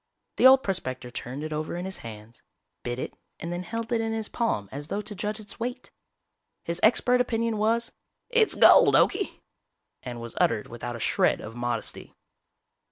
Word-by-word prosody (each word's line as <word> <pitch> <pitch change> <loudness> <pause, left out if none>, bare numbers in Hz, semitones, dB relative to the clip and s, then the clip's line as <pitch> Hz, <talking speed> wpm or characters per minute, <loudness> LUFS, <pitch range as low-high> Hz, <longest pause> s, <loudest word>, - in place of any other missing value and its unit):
The - - +8
old 265 0 +7
prospector 130 -10 -3
turned 130 +4 -6
it 155 0 -4
over 155 +2 -3
in 175 - -4
his 190 0 -4
hands, 110 0 -11 0.4
bit 120 0 -4
it - - -5 0.3
and 170 +1 -4
then 175 - -3
held 230 +5 -5
it 230 -1 +2
in 225 0 -2
his 220 -1 -3
palm 165 - -1
as 145 +2 -6
though 205 +5 -3
to 210 +1 -6
judge 210 +2 -3
its 210 +1 -12
weight. 245 +2 -5 0.7
His 170 +1 -3
expert 250 +3 +4
opinion 230 -2 -1
was, 230 +2 +1 0.4
"It's 475 -3 +3
gold, - - +7
Okie," - - +2 0.6
and 120 -1 -7
was 115 -1 -7
uttered 110 -2 +2
without 120 +1 -6
a - - -7
shred - - +2
of 110 +1 -9
modesty. 120 -2 -2
180 Hz, 180 wpm, -26 LUFS, -, 0.7 s, The